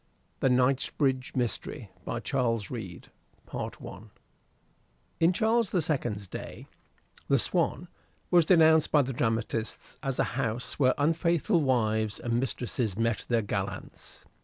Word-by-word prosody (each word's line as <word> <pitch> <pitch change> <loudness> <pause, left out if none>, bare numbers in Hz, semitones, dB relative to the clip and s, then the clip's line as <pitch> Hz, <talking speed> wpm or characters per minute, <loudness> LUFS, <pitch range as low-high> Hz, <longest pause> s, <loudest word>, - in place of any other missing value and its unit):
THE 135 - +3
KNIGHTSBRIDGE 130 +2 +1
MYSTERY 120 -4 -2
By - - -3
CHARLES 115 -3 -1
READE 100 -8 -7 0.4
I - - -2 1.5
In 165 +2 +5
Charles 220 +3 +2
the 180 - +1
Second's 120 -9 -1
day - - -8 0.6
the 140 - +4
"Swan" 175 +5 +1 0.4
was 175 -3 +5
denounced 160 -3 +5
by 145 -2 +5
the 135 +1 -4
dramatists 115 -1 -2
as 135 -3 -2
a - - +3 0.2
house 115 +3 -2
where 130 -2 +4
unfaithful 165 +4 +2
wives 110 -5 +1
and 120 0 0
mistresses 120 -4 -2
met 115 0 0
their 115 -2 +2
gallants. 100 -1 -6
125 Hz, 125 wpm, -28 LUFS, 115-155 Hz, 1.5 s, In